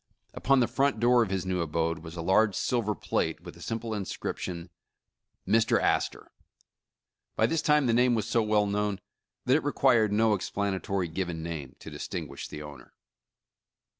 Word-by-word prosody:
Upon 135 -1 +3
the 120 - +3
front 135 +1 +1
door 120 +1 +5
of 110 - 0
this 95 -1 -2
new 90 -1 -1
abode 80 +1 -1
v^^as 80 +1 -9
a 85 - -4
large 100 +3 +3
silver 115 -5 0
plate, - - -2
with - - -10
the - - -16
simple 115 0 -4
inscription, 90 -3 -5 0.8
''Mr. 115 0 +3
Astor." - - -1 1.0
By - - +3
this 165 -1 0
time 150 -2 +3
the 120 - +2
name 125 +1 +4
was 110 -1 -1
so 115 +1 +2
well 105 -1 +2
known 100 0 -1 0.5
that 130 +1 +4
it 155 - -3
required 125 -7 +3
no 110 +1 +3
ex 100 - -2
planatory 95 -3 -2
given 85 -3 -3
name 80 -6 -6
to - - -10
distinguish - - -6
the 75 - -8
owner. 75 -4 -12
105 Hz, 170 wpm, -28 LUFS, 90-120 Hz, 1.0 s, door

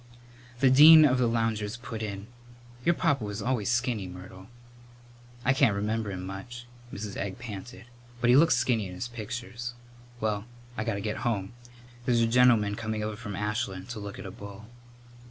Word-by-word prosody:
The 135 -2 +5
dean 155 +3 +10
of 130 -3 +3
the 125 - +3
loungers 115 -2 -1
put 115 -2 -7
in, 100 -2 -5 0.6
"Your 170 +4 +3
papa 150 -9 +1
was 105 0 -4
always 120 -1 -1
skinny, 120 -5 0
Myrtle." 95 +1 -11 1.0
"I 130 - +4
can't 130 -6 +3
remember 105 +1 -1
him 95 -2 -5
much," 120 +6 -8 0.3
Mrs. 100 -1 -6
Egg 100 -1 -4
panted, 120 0 -8 0.3
"but 120 0 +3
he - - +7
looks 150 -1 +6
skinny 115 -4 +1
in 90 - -9
his 120 - -4
pictures. 120 +1 -6 0.4
Well, 105 -1 -1 0.3
I 110 - -3
got 115 - -1
to 100 - -4
get 105 +1 -3
home. 105 -3 -2 0.5
There's 120 -2 +3
a - - +4
gentleman 115 -3 +4
coming 110 0 -3
over 105 0 -3
from 105 -3 -7
Ashland 100 -1 -3
to 120 -3 -5
look 100 -1 -7
at - - -8
a 95 - -6
bull." 100 +1 -10
110 Hz, 180 wpm, -28 LUFS, 100-120 Hz, 1.0 s, dean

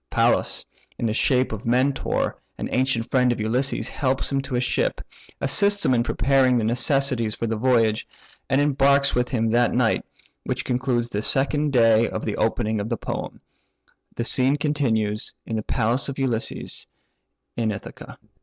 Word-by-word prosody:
Pallas, - - +1 0.3
in - - -2
the 110 - 0
shape 130 +2 +2
of 110 +2 -6
Mentor 130 +3 +1 0.2
(an - - -4
ancient 125 -3 +1
friend 125 -1 +3
of 120 - -2
Ulysses), 125 +5 -1
helps 130 0 -1
him 135 0 +1
to 135 -1 -5
a - - +2
ship, 125 - 0 0.4
assists 200 +9 +2
him - - +3
in 120 - +3
preparing 130 +2 +2
necessaries 120 0 0
for - - -3
the 115 0 -1
voyage, 115 -2 +2 0.4
and 135 - +3
embarks 140 -1 +3
with 125 0 0
him 115 -3 0
that 120 +1 +2
night; 120 -2 +2 0.4
which 130 0 -3
concludes 125 -2 0
the 105 -2 -2
second 145 +5 0
day 115 -3 +4
from - - -5
the 105 - -2
opening 110 -1 0
of 100 +2 -4
the 115 - -1
poem. - - -6 0.7
The 115 - -2
scene 130 +3 +3
continues 115 -8 -1
in 115 - -4
the - - -1
palace 120 +5 -1
of 140 - -6
Ulysses, 125 -4 -3 0.7
in 115 -2 0
Ithaca. 100 - -9
125 Hz, 165 wpm, -23 LUFS, 115-135 Hz, 0.7 s, day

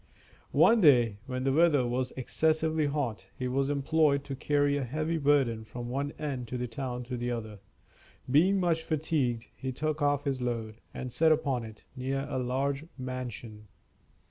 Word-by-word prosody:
One 230 -1 +6
day, 120 - +5
when 130 -1 -3
the 135 0 +2
weather 150 -4 +4
was 125 +1 -1
excessively 155 +3 +1
hot, 120 -10 -2
he 125 - -2
was 135 +2 0
employed 145 0 +2
to 140 -1 -5
carry 145 +1 +1
a 145 - -1
heavy 155 +6 -2
burden 135 -6 +2
from 120 +2 -7
one 140 +3 -2
end 135 -6 -4
of 125 - -2
the 125 - -2
town 125 +1 -4
to 125 +1 -5
the 120 +1 -2
other. 110 -4 -5 0.7
Being 175 +9 +4
much 170 -3 +1
fatigued, 145 -7 -1
he 130 - -4
took 155 +4 -2
off 145 -1 +2
his 135 -2 -1
load, 115 -3 -3
and 125 -2 -6
sat 160 0 +4
upon 140 -6 +1
it, 110 -1 -12
near 135 +1 -2
a 130 - -2
large 135 +4 -1
mansion. 125 -4 -6
135 Hz, 170 wpm, -29 LUFS, 125-150 Hz, 0.7 s, One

